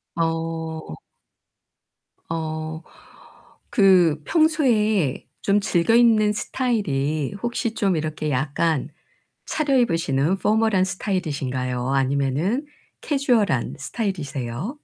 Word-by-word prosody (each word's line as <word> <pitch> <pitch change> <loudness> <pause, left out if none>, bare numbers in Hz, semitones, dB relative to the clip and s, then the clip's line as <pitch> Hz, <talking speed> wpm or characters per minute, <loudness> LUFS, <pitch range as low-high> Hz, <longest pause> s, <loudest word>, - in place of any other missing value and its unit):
어. 165 - -3 1.3
어 160 0 -4 0.9
그 180 - +4
평소에 225 - +2
좀 200 +1 +2
즐겨 195 +2 +2
입는 220 -3 +5
스타일이 155 - -1
혹시 240 -1 -1
좀 195 -4 +1
이렇게 155 0 -3
약간 145 +2 0 0.6
차려입으시는 190 - +1
포멀한 215 -3 +2
스타일이신가요, 135 - -2
아니면은 140 - 0 0.4
캐주얼한 245 - +1
스타일이세요? 155 - -4
170 Hz, 215 characters per minute, -23 LUFS, 150-220 Hz, 1.3 s, 입는